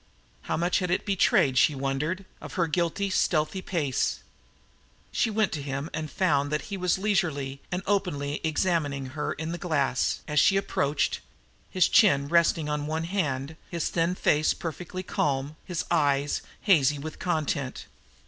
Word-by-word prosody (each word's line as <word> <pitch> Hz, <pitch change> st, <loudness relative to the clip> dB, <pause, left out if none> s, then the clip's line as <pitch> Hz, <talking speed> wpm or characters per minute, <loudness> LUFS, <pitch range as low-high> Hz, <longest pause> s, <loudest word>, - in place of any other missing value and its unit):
How -, -, +1 dB
much 175 Hz, +2 st, +1 dB
had 180 Hz, -2 st, -2 dB
it 180 Hz, -, 0 dB
betrayed, 155 Hz, -9 st, +3 dB
she 150 Hz, -, +4 dB
wondered, 140 Hz, +8 st, -2 dB, 0.2 s
of -, -, -8 dB
her 175 Hz, -4 st, +1 dB
guiltily 175 Hz, +4 st, -1 dB
stealthy 175 Hz, +1 st, +1 dB
pace? 150 Hz, -9 st, -1 dB, 0.9 s
She 230 Hz, -, +1 dB
went 215 Hz, -1 st, +1 dB
to 150 Hz, -, -3 dB
him 140 Hz, +2 st, -4 dB
and 155 Hz, 0 st, -3 dB
found 145 Hz, -5 st, +1 dB
that 150 Hz, -, -1 dB
he -, -, 0 dB
was 180 Hz, -1 st, +1 dB
leisurely 155 Hz, -9 st, -1 dB
and 180 Hz, +1 st, -2 dB
openly 150 Hz, -8 st, -1 dB
examining 155 Hz, -4 st, 0 dB
her 150 Hz, -1 st, -2 dB
in 160 Hz, +2 st, -5 dB
the 175 Hz, -, -4 dB
glass, 145 Hz, -7 st, 0 dB
as 150 Hz, -1 st, +2 dB
she 195 Hz, -, +5 dB
approached, 145 Hz, -6 st, 0 dB, 0.5 s
his 185 Hz, -2 st, +3 dB
chin 140 Hz, -10 st, +4 dB
resting 170 Hz, -2 st, +3 dB
on 150 Hz, 0 st, -2 dB
one 160 Hz, +1 st, -2 dB
hand, 160 Hz, -5 st, -2 dB
his 170 Hz, -2 st, -2 dB
thin 170 Hz, +2 st, 0 dB
face 155 Hz, -3 st, +2 dB
perfectly 175 Hz, +3 st, -5 dB
calm, 145 Hz, -4 st, -1 dB
his 180 Hz, -2 st, -3 dB
eyes 145 Hz, -3 st, +2 dB, 0.2 s
hazy 150 Hz, -7 st, +4 dB
with 155 Hz, +2 st, -7 dB
content. 155 Hz, -6 st, -2 dB
155 Hz, 160 wpm, -27 LUFS, 145-180 Hz, 0.9 s, she